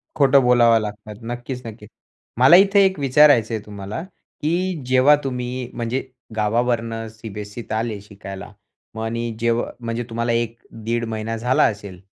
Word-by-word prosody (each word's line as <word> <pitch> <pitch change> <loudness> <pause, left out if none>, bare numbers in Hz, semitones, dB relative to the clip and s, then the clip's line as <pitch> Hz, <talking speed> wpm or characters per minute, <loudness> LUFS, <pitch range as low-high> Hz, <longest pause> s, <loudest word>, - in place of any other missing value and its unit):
खोटं 140 -1 +5
बोलावं 120 -2 +5
लागतात. 105 0 -7
नक्कीच, 120 +2 -5
नक्कीच. 110 -1 -10 0.5
मला 135 +7 +8
इथे 200 +1 +6
एक 190 -4 0
विचारायचं 135 -4 +4
आहे 110 - -2
तुम्हाला, 100 +6 -6 0.4
की 175 +1 -1
जेव्हा 130 +3 +5
तुम्ही 125 -1 -4
म्हणजे 120 +3 -3 0.3
गावावरनं 115 +1 0
सीबीएससीत 110 0 -9
आले 110 -2 -2
शिकायला 100 -1 -10 0.4
मग 110 - -4
आणि 115 +1 -3
जेव 115 0 +1 0.2
म्हणजे 115 0 -3
तुम्हाला 115 +1 -1
1-1.5 115 0 -3
महिना 110 0 -4
झाला 125 +3 +2
असेल 100 -4 -2
115 Hz, 140 wpm, -21 LUFS, 110-125 Hz, 0.5 s, मला